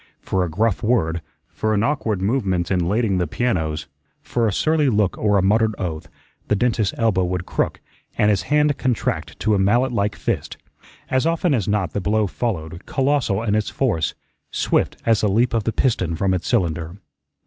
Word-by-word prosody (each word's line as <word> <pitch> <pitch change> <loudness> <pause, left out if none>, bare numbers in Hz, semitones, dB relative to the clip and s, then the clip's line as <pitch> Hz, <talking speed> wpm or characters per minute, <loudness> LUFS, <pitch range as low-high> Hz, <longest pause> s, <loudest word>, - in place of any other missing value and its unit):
For 95 -1 -1
a 90 - -2
gruff 105 +5 0
word, 85 -9 +1 0.3
for 110 0 -1
an 105 - +1
awkward 115 -9 -1
movement 95 -6 0
in 90 -2 +1
lading 105 -3 +1
the 90 - 0
pianos, 80 -7 -1 0.4
for 120 -2 0
a - - +1
surly 155 - +2
look 105 -4 +1
or 105 -1 +2
a 95 - +2
muttered 110 +2 +2
oath, 80 -5 -4 0.4
the 105 - +2
dentist's 110 -2 +1
elbow 110 -5 +2
would 90 0 -2
crook - - -1 0.4
and 105 - +4
his 100 - +1
hand 150 -1 +3
contract 125 -3 -2
to 110 - +2
a 100 - +2
mallet 120 +7 +3
like 105 -3 0
fist. - - -3 0.5
As 130 +4 +2
often 165 -1 +1
as 110 -7 0
not 100 -5 0
the 100 - -1
blow 105 +3 +1
followed, 85 -6 -4
colossal 135 -7 +1
in 105 -3 0
its 105 -1 +1
force, 105 - 0 0.3
swift - - 0
as 115 -2 +3
the 105 - +2
leap 115 +5 +2
of 115 -3 0
the 115 - +1
piston 95 -8 0
from 95 +3 +1
its 90 - -2
cylinder. 85 -5 -1
105 Hz, 190 wpm, -21 LUFS, 90-120 Hz, 0.5 s, and